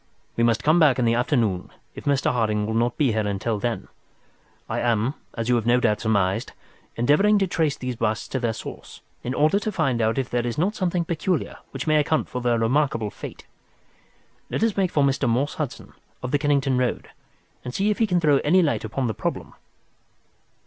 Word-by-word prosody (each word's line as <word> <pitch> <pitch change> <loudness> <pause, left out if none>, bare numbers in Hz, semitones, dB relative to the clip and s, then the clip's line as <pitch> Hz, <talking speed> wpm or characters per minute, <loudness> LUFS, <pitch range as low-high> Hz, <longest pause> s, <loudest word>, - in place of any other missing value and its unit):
"We 115 - +1
must 115 -1 +2
come 155 +3 +4
back 150 -6 +5
in 125 - +1
the 115 - +3
afternoon, 115 - 0 0.2
if - - -10
Mr. 140 -2 +2
Harding 110 -3 0
will 110 - -2
not 120 +1 0
be 140 -5 +3
here 110 -1 0
until 105 +2 -2
then. 120 +1 -3 0.8
I - - -2
am, 120 +2 +1 0.2
as 115 -1 -3
you 125 - +3
have 115 0 -2
no 120 +1 +4
doubt 105 -3 +1
surmised, 100 -4 0 0.4
endeavouring 150 - +4
to 195 - +2
trace 160 -5 0
these 125 -2 -4
busts 110 -1 -1
to 130 - -2
their 120 -2 0
source, 110 - -9 0.2
in 125 +2 -3
order 155 +7 +3
to 215 +1 -3
find 140 - 0
if 115 +4 0
there 120 0 0
is 120 - -3
not 185 +7 +1
something 180 -4 -1
peculiar 170 +1 -2
which 135 0 -5
may 155 -1 +3
account 150 +1 +1
for 125 - -4
their 120 -1 +2
remarkable 115 -2 +1
fate. - - -9 1.0
Let - - -1
us 225 -3 +1
make 190 -2 +1
for 145 -4 +2
Mr. 135 -2 +1
Morse 130 +6 0
Hudson, 150 -6 -5 0.3
of 125 - -3
the 145 - +2
Kennington 140 -3 +1
Road, 125 -1 -1 0.5
and 125 - -5
see 200 +10 +1
if 210 - -2
he 225 - +3
can 180 -3 +2
throw 150 -4 +4
any 180 +5 +3
light 150 - 0
upon 120 +4 -2
the 110 - -1
problem." - - -4
125 Hz, 205 wpm, -24 LUFS, 115-155 Hz, 1.0 s, back